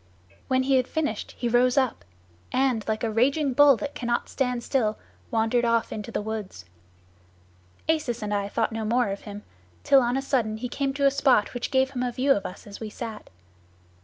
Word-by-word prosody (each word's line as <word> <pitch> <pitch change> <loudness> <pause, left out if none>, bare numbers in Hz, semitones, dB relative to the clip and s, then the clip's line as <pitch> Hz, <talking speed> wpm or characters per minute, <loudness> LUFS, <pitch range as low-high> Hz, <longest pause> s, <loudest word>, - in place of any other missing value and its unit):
"When 260 0 +2
he 270 0 +3
had 255 -1 +1
finished 300 -9 -3
he 240 - -1
rose 245 +2 +3
up, 255 - +1 0.5
and, 255 -4 +1
like 220 +1 -1
a 225 - 0
raging 270 +5 +2
bull 285 -1 +6
that 280 +7 -5
cannot 240 -1 -2
stand 250 -2 -1
still, 220 -6 0 0.3
wandered 225 +1 +1
off 230 -1 +1
into 210 +1 -6
the 210 - -2
woods. 210 - -6 1.2
Acis 280 -8 0
and 210 0 -2
I 200 0 -1
thought 225 +2 0
no 225 0 -3
more 235 +1 +1
of 195 0 -4
him, 205 0 -8 0.4
till 275 - +6
on 245 +1 0
a - - 0
sudden 230 -6 0
he 250 +2 -5
came 275 +2 -1
to 280 -1 +1
a 275 - +6
spot 265 -6 +3
which 245 - -3
gave 265 -1 +2
him 250 -2 -4
a 250 -1 -1
view 265 +3 +1
of 200 -7 +2
us 180 - -11
as 200 -1 -10
we 220 - -5
sat. 220 0 -7
240 Hz, 205 wpm, -26 LUFS, 220-265 Hz, 1.2 s, bull